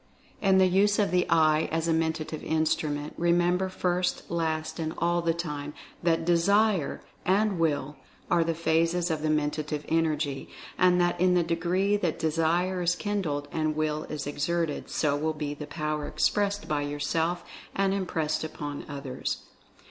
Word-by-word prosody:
f 195 - +2
In 190 - +6
the 190 - +6
use 200 +3 +3
of 205 - +2
the 180 0 +2
Eye 155 -1 +4
as 165 +1 0
a 165 - +3
Mentative 160 -1 -1
Instrument, 155 -2 -1
re 170 0 +3
member 175 +2 +2
first, 180 -1 -1
last, 160 -1 -1
and 160 -1 -3
all 175 +1 +1
the 165 0 +2
time, 150 -3 -4 0.3
that 165 -1 +1
DESIRE 190 0 +2 0.2
and 195 0 +2
WILL 145 -3 0 0.3
are 170 -1 +3
the 165 0 -1
phases 165 +2 +1
of 155 -1 -1
the 155 - 0
Mentative 150 0 -1
Energy, 155 -4 0 0.3
and 180 -1 +4
that 175 0 +1
in 180 0 +4
the 175 - +4
degree 180 +5 +1
that 175 -6 -1
Desire 165 +4 +1
is 175 0 +2
kindled, 175 -9 -2
and 155 -1 0
Will 155 0 -1
is 150 -2 -5
exerted, 150 +2 -2
so 145 -2 +1
will 155 +2 -1
be 150 -1 -3
the 145 0 -8
Power 150 -1 -3
expressed 205 +6 0
by 150 -1 0
yourself, 160 +4 -1 0.3
and 195 0 +2
impressed 165 -6 -1
upon 145 -2 -5
others. 140 -3 -4
165 Hz, 165 wpm, -28 LUFS, 150-180 Hz, 0.3 s, In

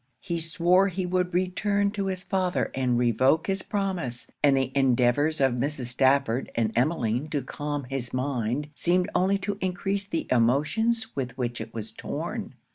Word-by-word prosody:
He 170 -3 -2
swore 175 +3 +3
he 185 -1 -2
would 180 0 0
return 200 +3 +1
to 200 -2 -2
his 185 -1 -3
father 185 -2 0
and 125 -2 +1
revoke 130 +7 +3
his 195 -1 0
promise; 185 - -2 0.2
and 140 -2 +5
the 135 -1 0
endeavours 135 +3 +3
of 135 -2 +3
Mrs. 135 -1 -2
Stafford 130 -1 +2
and 110 -2 +1
Emmeline 125 0 +1
to 145 -3 -1
calm 145 +2 -4
his 125 -1 -4
mind 130 +2 -2
seemed 180 +4 +1
only 190 +2 +2
to 200 +1 -4
encrease 195 +2 -1
the 165 -4 -2
emotions 150 - +2
with 125 -3 -4
which 120 -2 -2
it - - -7
was 110 -1 -5
torn. - - -5
150 Hz, 165 wpm, -26 LUFS, 125-185 Hz, 0.2 s, and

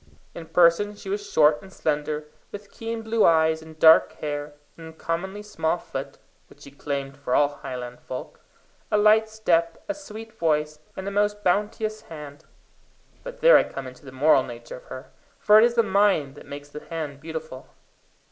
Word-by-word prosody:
In 165 -1 -9
person 180 +5 +3
she 200 - -10
was 205 +1 -4
short 150 -3 +4
and 190 -1 -14
slender, 150 -2 -2 0.3
with 205 0 -10
keen 225 0 -5
blue 225 0 +1
eyes 160 -1 +4
and 160 0 -13
dark 160 0 +6
hair; 145 0 -5 0.2
an 165 -1 -11
uncommonly 170 +5 -4
small 160 -6 -1
foot, - - -7 0.3
which - - -20
she 140 - -12
claimed 140 -1 -4
for 140 -3 -2
all 145 -1 +4
Highland 125 -1 -7
folk; 130 - -8 0.5
a - - +2
light 215 +1 +4
step, 170 -6 +1
a 300 - -1
sweet 225 -7 -10
voice, 150 -5 0 0.2
and 190 +1 -5
a - - -2
most 205 +1 0
bounteous 210 +3 0
hand 150 -1 -11 0.8
but - - -9
there - - +8
I - - +4
come 135 - -7
into 130 +1 -11
the 135 - -11
moral 135 +1 +4
nature 120 -2 -8
of - - -16
her, 130 - -10 0.3
for 210 +1 +6
it - - +6
is 235 0 +3
the 230 - +4
mind 195 -9 +2
that - - -14
makes 145 0 -9
the 150 +1 -9
hand 150 -4 -6
bountiful. 160 -4 -7
165 Hz, 185 wpm, -25 LUFS, 145-205 Hz, 0.8 s, there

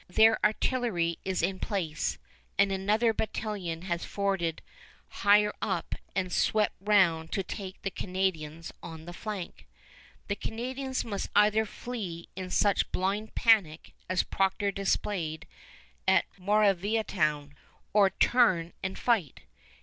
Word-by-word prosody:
Their 220 +4 +5
artillery 210 -6 +1
is 190 -3 -1
in 185 +1 0
place, 170 -7 -2 0.4
and 200 -1 +4
another 210 +4 +2
battalion 200 -7 -3
has 170 -2 -2
forded 195 -5 -1 0.5
higher 210 +1 +4
up - - -2 0.2
and 185 -2 -1
swept 215 -1 +2
round 180 -6 +3
to 195 - 0
take 190 0 -7
the 195 - -2
Canadians 165 -5 -2
on 160 -1 -9
the 175 - -8
flank. 200 -2 -6 0.6
The 200 - -1
Canadians 260 +5 -3
must 200 -4 -3
either 215 +1 +4
flee 200 -9 -6
in 185 0 -5
such 200 +1 +2
blind 200 +4 -2
panic 200 -9 +3 0.2
as 185 0 +2
Procter 195 +1 0
displayed 190 -4 -1 0.6
at - - +5
Moraviantown, 195 -6 +1 0.4
or 200 -2 +6
turn 190 -5 +3
and 190 0 -3
fight. 210 - 0
195 Hz, 120 wpm, -29 LUFS, 175-215 Hz, 0.6 s, or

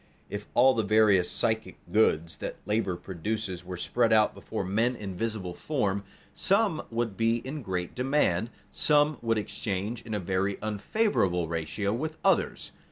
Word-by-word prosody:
_ - - -32 0.3
If 105 0 -5
all 130 +2 +6
the 115 - +1
various 105 -3 +4
psychic 110 0 -1
goods 85 -7 +2
that - - -5
labor 105 -3 0
produces 95 +1 -4
were 90 0 -6
spread 115 +6 +1
out 110 -1 +5
before 110 -3 -4
men 115 +6 +1
in 100 -5 -6
visible 105 -4 -3
form, 100 - -1 0.3
some 195 -5 +2
would 115 -3 -2
be 115 +1 +2
in 145 +3 -4
great 90 -5 -3
demand, 125 -6 +1 0.2
some 150 0 +3
would 115 -1 +1
exchange 105 +2 -3
in 110 -2 -5
a - - 0
very 95 +2 -1
unfavorable 105 - +1
ratio 85 +5 -2
with 155 +6 -3
others. - - +1
110 Hz, 160 wpm, -28 LUFS, 95-120 Hz, 0.3 s, all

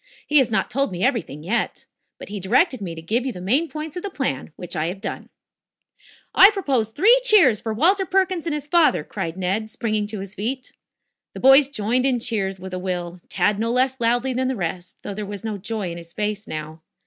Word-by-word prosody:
He 300 0 +4
has 260 - +2
not 220 - -1
told 275 -2 0
me 180 +1 -4
everything 230 - -1
yet. 220 +8 -2 0.3
But - - -10
he 205 0 -5
directed 240 - +2
me 170 -4 -5
to 160 - -9
give 230 +8 0
you 265 - -2
the 185 - -9
main 260 - +1
points 305 0 -6
of 360 - -4
the 405 - -4
plan, 250 - -3
which 175 - -7
I 155 - -1
have 185 +3 -5
done." - - -6 1.0
"I 390 - +9
propose 275 - 0
three 445 - +5
cheers 370 - +6
for 225 - -3
Walter 365 - +2
Perkins 375 -3 0
and 320 - -1
his 295 -2 -5
father," 315 - +3
cried 165 +3 -5
Ned, 195 +4 -1
springing 215 -2 -2
to 215 -1 -6
his 195 0 -7
feet. 245 +6 -4 0.6
The - - -6
boys 270 +1 +7
joined 250 +1 0
in 260 - +2
the 240 - -3
cheers 195 -5 -2
with 190 0 -8
a 185 - -3
will, 180 -1 -4
Tad 210 -1 +1
no 230 +1 0
less 260 +1 +1
loudly 240 +3 +1
than 255 +1 0
the 260 - -1
rest, 175 -2 -5
though 205 - -5
there 210 +2 -5
was 200 -1 -7
no 215 -2 -4
joy 210 -2 -4
in 170 - -7
his 170 0 -13
face 210 +1 -3
now. 155 +1 -7
220 Hz, 230 wpm, -22 LUFS, 190-270 Hz, 1.0 s, I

